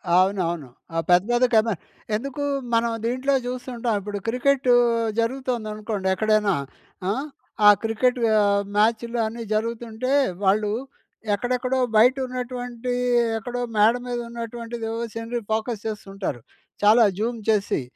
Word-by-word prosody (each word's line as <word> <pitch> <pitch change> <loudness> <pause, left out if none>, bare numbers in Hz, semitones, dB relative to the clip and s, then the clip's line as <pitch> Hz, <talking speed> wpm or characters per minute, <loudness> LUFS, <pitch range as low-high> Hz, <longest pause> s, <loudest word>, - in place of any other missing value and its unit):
అవునవును. 180 -6 +1 0.3
ఆ - - 0
పెద్దది 240 +8 +4
కెమ 220 0 +5 0.5
ఎందుకు 275 +5 -4 0.3
మనం 230 0 +2
దీంట్లో 255 +4 0
చూస్తుంటాం. 245 -3 -2
ఇప్పుడు 205 +1 -5
క్రికెట్ 255 +2 +1 0.5
జరుగుతుందనుకోండి. 225 -5 -2
ఎక్కడైనా 215 0 +2 0.6
ఆ! - - +3 0.6
ఆ - - +12
క్రికెట్ 245 +3 +1 0.2
ఆహ్, 200 -1 +3
మ్యాచ్‍లు 230 +3 +1
అన్నీ 230 +2 -5
జరుగుతుంటే, 230 +3 -2 0.3
వాళ్ళు 205 +2 +2 0.6
ఎక్కడెక్కడో 250 +4 -1 0.2
బయట 245 +4 +6
ఉన్నటువంటి 250 -1 -5 0.5
ఎక్కడో 245 +2 -4 0.2
మేడ 215 +2 +6
మీద 245 -1 -2
ఉన్నటువంటిది 235 0 -6
ఓ - - -3 0.2
సీనరీ 230 +1 -3
ఫోకస్ 220 0 -1
చేస్తుంటారు. 195 - -5 0.4
చాలా 220 +3 +7 0.2
జూమ్ 230 +2 -1
చేసి. 205 -7 +1
230 Hz, 115 wpm, -24 LUFS, 210-245 Hz, 0.6 s, ఆ